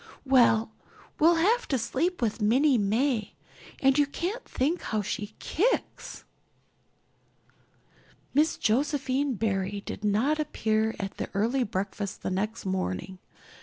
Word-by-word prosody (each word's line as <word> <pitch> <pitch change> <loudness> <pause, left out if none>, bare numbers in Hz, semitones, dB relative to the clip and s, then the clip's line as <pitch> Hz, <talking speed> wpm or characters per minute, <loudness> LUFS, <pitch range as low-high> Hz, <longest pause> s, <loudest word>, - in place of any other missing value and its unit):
Well, 235 -4 +4 0.5
we'll 335 +3 +6
have 430 +9 +2
to 270 - +1
sleep 285 +7 -1
with 225 0 -1
Minnie 255 +5 +4
May 220 +2 0 0.4
and 270 +1 +3
you 290 - +4
can't 370 - -4
think 305 +7 -1
how 215 -2 -2
she 205 +2 -4
kicks." 450 +10 -2 2.1
Miss 300 +4 +2
Josephine 275 +2 0
Barry 200 -1 -2
did - - -6
not 225 +10 +1
appear 220 -7 0
at 195 -1 -5
the - - -4
early 235 +6 +1
breakfast 200 -1 -4
the - - -2
next 210 +4 -2
morning. 185 - -3
235 Hz, 125 wpm, -27 LUFS, 205-290 Hz, 2.1 s, we'll